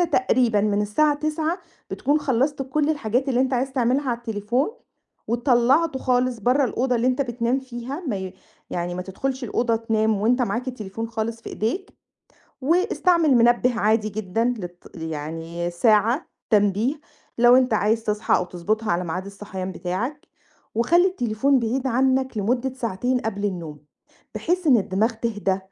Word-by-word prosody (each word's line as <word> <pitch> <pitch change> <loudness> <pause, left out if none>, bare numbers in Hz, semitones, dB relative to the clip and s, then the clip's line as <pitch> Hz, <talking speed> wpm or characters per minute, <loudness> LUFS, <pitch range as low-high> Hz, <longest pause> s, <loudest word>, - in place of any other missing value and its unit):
تقريبًا 255 -9 +2
من 205 0 +1
الساعة 290 +9 +2
21:00 310 +3 -1 0.3
بتكون 295 +2 +1
خلصت 270 +1 0
كل 295 +3 0
الحاجات 260 -2 0
اللي 255 -1 +2
أنت 265 0 +1
عايز 260 +2 -1
تعملها 260 +2 +1
على 235 - -1
التليفون، 235 - -1 0.6
وطلّعته 255 +5 +2
خالص 250 -1 +1
برّه 255 +6 +3
الأوضة 250 +1 0
اللي 235 +2 0
أنت 255 +2 +2
بتنام 240 +1 -1
فيها، 260 +5 -7
ما 205 - -1
ي– 190 0 -6 0.4
يعني، 175 0 -3
ما 180 - -3
تدخلش 260 +8 -4
الأوضة 235 0 0
تنام 220 -2 0
وأنت 245 +4 +2
معاك 245 +2 -2
التليفون 225 -2 -5
خالص 225 0 -3
في - - -7
إيديك، 310 - -2 0.7
واستعمل 340 - +3
منبه 240 0 +3
عادي 215 0 +2
جدًا 215 +1 -2
للت– 175 -1 -10
يعني، 165 +2 -4
ساعة، 220 - +2 0.2
تنبيه، 210 +4 +2 0.4
لو 240 +1 +7
أنت 255 -4 +3
عايز 220 +2 +1
تصحى، 210 0 +1
أو - - 0
تضبطها 210 +5 -2
على 175 +1 0
ميعاد 180 +3 -4
الصحيان 195 -2 -6
بتاعك، 230 +14 -4 0.5
وخلّي 340 +11 +4
التليفون 260 - +1
بعيد 250 +3 -1
عنّك 260 -1 +1
لمدّة 245 +5 0
ساعتين 245 +1 -1
قبل 205 -2 -3
النوم، 170 -7 -4 0.6
بحيث 355 0 -1
إن 265 - +7
الدماغ 205 +2 +1
تهدى، 210 -4 -1
235 Hz, 150 wpm, -23 LUFS, 210-265 Hz, 0.7 s, لو